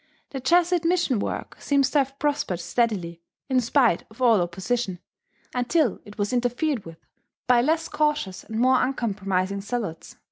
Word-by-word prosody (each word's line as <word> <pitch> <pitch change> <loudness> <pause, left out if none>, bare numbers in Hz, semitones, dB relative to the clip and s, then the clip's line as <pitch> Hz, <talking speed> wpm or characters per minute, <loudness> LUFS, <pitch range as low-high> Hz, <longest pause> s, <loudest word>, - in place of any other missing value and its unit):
The 270 - -4
Jesuit 345 +5 +3
mission 335 - +2
work - - -4
seems 280 -2 +2
to 295 - +3
have 275 0 -1
prospered 285 - -1
steadily, 180 -5 -1 0.3
in 260 -1 +3
spite 240 - +2
of 220 - -18
all 230 -6 +4
opposition, 190 +3 -2 0.6
until 250 - +1
it 205 - -13
was 205 +2 -1
interfered 245 0 0
with 165 0 -12 0.4
by 245 -1 +4
less 320 +5 +1
cautious 300 -11 -1
and 220 0 -5
more 255 +1 +4
uncompromising 200 -6 -1
zealots. 205 -6 -5
245 Hz, 150 wpm, -25 LUFS, 200-280 Hz, 0.6 s, all